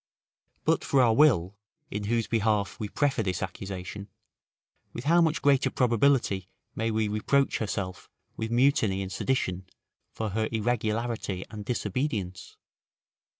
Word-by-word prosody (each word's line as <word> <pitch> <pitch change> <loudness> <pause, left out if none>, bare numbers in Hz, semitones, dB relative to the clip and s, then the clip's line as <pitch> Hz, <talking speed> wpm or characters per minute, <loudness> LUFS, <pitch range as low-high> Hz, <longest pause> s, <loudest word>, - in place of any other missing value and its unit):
But - - +2
for 140 - +2
our 120 -3 +5
will, 110 - +4 0.4
in 105 0 -3
whose 115 +1 +1
behalf 105 -4 0
we 105 - -3
prefer 140 0 +1
this 95 -4 -2
accusation, 95 +1 -6 0.9
with 120 - -6
how 170 +5 +4
much 160 -2 +1
greater 140 -1 +4
probability 120 -6 +2 0.3
may 115 +1 -1
we 110 -1 +1
reproach 120 +7 +1
herself 100 -4 -4 0.3
with 110 - -3
mutiny 120 -6 +2
and 95 - -6
sedition, 95 -4 -1 0.4
for 110 -1 -3
her 110 +2 -1
irregularity 110 -3 -1
and 105 -2 -6
disobedience? 105 -4 -3
110 Hz, 130 wpm, -28 LUFS, 100-125 Hz, 0.9 s, our